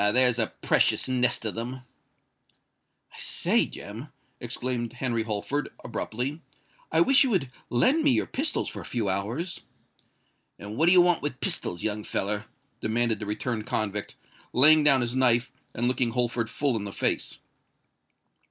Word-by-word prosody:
Ah! 105 - +3
there's 125 0 +4
a 110 - +2 0.2
precious - - +3
nest 125 -2 +1
of 110 - -2
them!" 125 +3 -5 1.3
"I - - -12
say, - - +1
Jem," - - -9 0.3
exclaimed 120 -2 -3
Henry 120 -2 -1
Holford, 110 +7 -2
abruptly, 130 +8 -4 0.5
"I - - +3
wish 275 -3 +6
you 265 - +1
would 175 - 0 0.2
lend 260 - +3
me 295 - +4
your 260 - +2
pistols 295 +3 -2
for - - -6
a - - -9
few 115 -5 -2
hours." 115 - -3 1.0
"And 105 +1 -8
what 160 +6 +2
do - - +6
you 180 -1 +7
want 175 -1 +2
with 140 -3 -4
pistols, 85 -2 -2
young 105 -1 -2
feller?" 105 +2 -2 0.3
demanded 115 0 +1
the 105 - -6
returned 110 +1 -3
convict, 105 -1 -2 0.4
laying 155 +4 +7
down 140 -3 +5
his 120 +1 -2
knife, 125 -2 +3 0.2
and 120 +2 -2
looking 125 -1 +2
Holford 120 -2 -1
full 135 +1 0
in 105 -2 -3
the 100 - -5
face. - - -1
120 Hz, 160 wpm, -26 LUFS, 110-140 Hz, 1.3 s, you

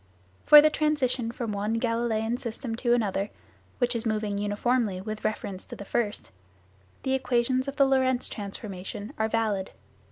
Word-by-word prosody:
For 295 0 +10
the 310 - +5
transition 265 -7 0
from 235 -2 -4
one 210 +3 -1
Galileian 230 0 0
system 230 0 -4
to 240 0 +3
another, 205 -3 -1 0.5
which 245 -1 +1
is 230 - 0
moving 215 -2 -1
uniformly 205 0 0
with 215 +2 -6
reference 200 -3 -3
to - - -9
the 200 - -9
first, 210 0 -2 0.7
the 265 - 0
equations 255 0 +1
of 275 - -4
the 275 - +5
Lorentz 260 -2 +2
transformation 205 +1 -6
are 220 - +2
valid. 215 -4 0
230 Hz, 155 wpm, -27 LUFS, 210-255 Hz, 0.7 s, For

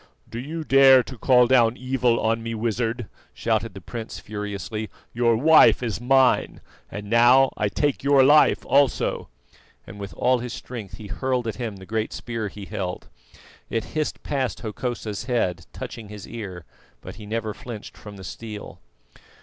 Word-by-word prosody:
"Do 115 - -6
you 160 +6 -5
dare 135 -2 +7
to 130 - -9
call 125 +1 +4
down 120 -2 +4
evil 130 -2 +1
on 115 +1 0
me, 115 0 -4
Wizard?" 115 +1 -2 0.3
shouted - - -1
the 95 - -8
prince 115 +5 -7
furiously. 105 0 -5 0.2
"Your 115 -1 +2
wife 155 0 +6
is 115 -3 -3
mine, 130 +1 +3 0.3
and 105 0 -7
now 120 +4 +5
I 105 - 0
take 145 +6 0
your 140 -1 +5
life 150 +3 +5
also," 140 0 +1 0.6
and 100 - -11
with 100 -1 -7
all 125 0 +2
his 120 0 -5
strength 115 -6 -8
he 110 - -10
hurled 125 +4 -2
at 110 -2 -4
him 115 -4 -4
the 95 -1 -12
great 110 +2 -2
spear 115 -3 -4
he 100 0 -9
held. 90 -2 -5 0.6
It 115 - -1
hissed 155 -1 -2
past 135 -3 -2
Hokosa's 110 -1 -4
head, 90 -9 -1
touching 110 -3 -8
his 105 -2 -9
ear, 95 -7 -7 0.4
but - - -10
he 105 -2 -10
never 110 0 -2
flinched 110 -1 -9
from 105 -1 -11
the 95 - -10
steel. 105 +1 -8
115 Hz, 165 wpm, -24 LUFS, 105-130 Hz, 0.6 s, dare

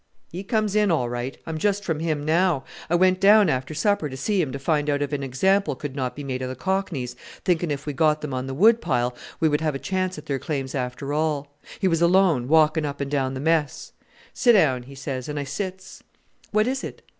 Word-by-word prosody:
"He 180 +3 -6
comes 215 -1 0
in 210 -1 +3
all 130 -8 +1
right. 120 +2 -4
I'm 160 -1 -4
just 205 +3 0
from 165 -5 -2
him 155 -3 -2
now. 165 -2 +2 0.3
I 175 - +2
went 185 +1 +3
down 205 +1 +6
after 130 +4 -2
supper 170 -2 +1
to 130 - -7
see 200 +6 +1
him 145 -6 -2
to 135 - -4
find 150 +1 0
out 145 0 +1
if 145 - -4
an 145 - -1
example 190 +10 +1
could 145 -3 -6
not 130 -3 -3
be 145 - -7
made 130 -2 -4
of 130 - -3
the 130 - -5
cockneys 165 -7 -2 0.3
thinking 175 -2 +1
if 140 -1 -3
we 145 - -3
got 155 +2 +2
them 150 -3 -5
on 130 +1 -3
the 135 - -4
wood 225 +8 +5
pile 125 +1 0 0.2
we 160 - +3
would 150 0 +1
have 155 -3 0
a - - -1
chance 185 +2 -2
at 150 - -9
their 140 -4 -2
claims 135 -1 -3
after 130 +2 -3
all. 145 -2 -1 0.2
He 190 - +1
was 165 -2 +1
alone, 170 -7 +3
walking 155 +1 +4
up 145 -1 -4
and 140 0 -3
down 135 -2 0
the - - -4
mess. 160 0 0 0.4
'Sit 240 - +4
down,' 130 - +3
he 140 - -11
says, 135 -1 -5
and 150 0 -3
I - - -2
sits. 190 +6 -6 0.5
'What 215 0 +2
is 265 +2 -2
it?' - - -8
150 Hz, 240 wpm, -24 LUFS, 135-185 Hz, 0.5 s, down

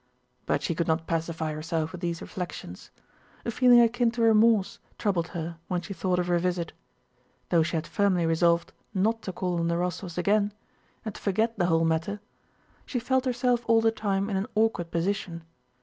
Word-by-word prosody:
But - - 0
she 170 - 0
could 165 +1 -1
not 160 0 +1
pacify 160 -1 -2
herself 160 +1 -2
with 180 - -8
these 170 -2 -3
reflections; 175 - -7 0.6
a 235 - -1
feeling 245 0 +6
akin 235 +1 +3
to 230 0 -1
remorse 220 -2 +4 0.2
troubled 180 -6 0
her 165 0 -6
when 180 -1 -1
she 195 - -7
thought 180 +1 0
of 180 - +1
her 175 -1 +2
visit. 175 -1 -2 0.8
Though 170 - +4
she 160 +1 -1
had 160 - -1
firmly 195 -4 +1
resolved 170 +1 +2 0.2
not 220 +4 +1
to 190 - -5
call 180 -1 -2
on 165 - 0
the 170 - +1
Rostóvs 180 0 -3
again 205 +3 +2 0.5
and 215 - -4
to - - -11
forget 220 +4 +1
the 175 - +3
whole 165 -1 +3
matter, 165 +6 0 0.6
she 255 - -4
felt 260 +2 +1
herself 245 -1 +1
all 230 -1 +5
the 225 0 +3
time 200 -3 -1
in 200 -3 -1
an 195 +4 -2
awkward 215 -6 +1
position. 170 -1 -2
180 Hz, 190 wpm, -27 LUFS, 170-220 Hz, 0.8 s, feeling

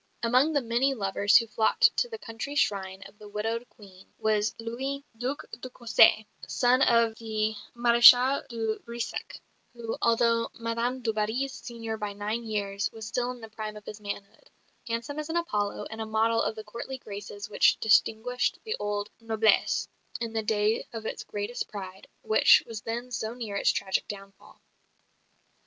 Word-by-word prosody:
Among 255 +6 +4
the 285 - +2
many 245 +4 +1
lovers 200 -1 +4
who 230 - +2
flocked 225 - +3
to 485 - +1
the 455 - -6
country 255 - -6
shrine 195 -7 0
of 210 - -15
the 210 - -11
widowed 225 +3 -3
"Queen," 195 -4 -16
was 215 0 +1
Louis, 265 +5 -4
Duc 250 +5 -3
de 245 +3 -8
Cossé, 225 -3 +4 0.2
son 250 +1 +3
of 230 -2 +4
the 220 -1 -1 0.2
Maréchal 240 +3 +6
de 225 -3 -2
Brissac, 235 0 -6 0.4
who, 230 -1 -4
although 230 0 +2
Madame 235 +2 -2
du 225 -1 0
Barry's 225 +6 -1
senior 230 -3 -6
by 210 -2 -4
nine 210 +3 -3
years, 200 -2 -2
was 220 -1 -8
still 245 +3 -1
in 250 -1 -7
the 225 - -9
prime 215 0 -6
of 210 - -13
his 210 0 -9
manhood 200 -1 -8 0.4
handsome 235 +6 -3
as 305 +1 -5
an 330 - 0
Apollo 210 -12 -1
and 220 0 -6
a - - -2
model 225 +1 +2
of - - -1
the 215 - -7
courtly 235 +5 -7
graces 205 -3 -8
which - - +3
distinguished 225 +3 +2
the 445 -1 -2
old 205 0 -3
noblesse 225 -1 +2 0.3
in 230 -1 -4
the 220 - 0
day 215 0 +1
of 225 -1 -6
its - - -4
greatest 205 +4 -4
pride, 190 -2 -8 0.2
which 220 0 +6
was 225 -2 -7
then 240 +3 -5
so 230 -1 -3
near 225 -5 -5
its - - +2
tragic 190 -1 -1
downfall. 195 -1 -11
225 Hz, 170 wpm, -28 LUFS, 210-240 Hz, 0.4 s, Maréchal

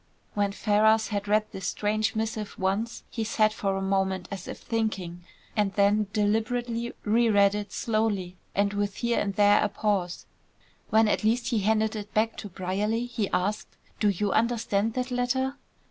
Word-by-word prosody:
When 205 -1 +1
Ferrars 220 +2 +3
had 205 -1 -2
read 215 +1 +3
this 190 -1 -5
strange 215 +1 0
missive 220 -1 -3
once, 200 +5 -1
he 225 - -2
sat 215 -1 +2
for 195 -3 -1
a 195 - -2
moment 190 -2 0
as 195 -2 -6
if - - -6
thinking, 195 -6 -3 0.3
and 205 -3 +1
then 205 +1 +3
deliberately 230 +3 0
re 230 +2 +3
read 200 -1 +5
it 205 -1 -4
slowly, 215 -5 -1 0.2
and 200 +1 +2
with 205 -1 -1
here 235 -1 0
and 200 -1 -2
there 205 0 +5
a 210 - +1
pause; 200 -4 -1 0.6
when 220 0 +4
at 210 - +1
last 230 +3 +1
he 230 - +1
handed 220 +2 +1
it 210 -1 -7
back 220 +1 +2
to 205 - -6
Brierly, 200 +6 -1
he 235 -5 -2
asked: 205 +4 -2 0.2
"Do 210 - +3
you 200 +1 0
understand 225 -2 +1
that 255 0 -2
letter?" 260 +2 0
210 Hz, 175 wpm, -27 LUFS, 200-225 Hz, 0.6 s, read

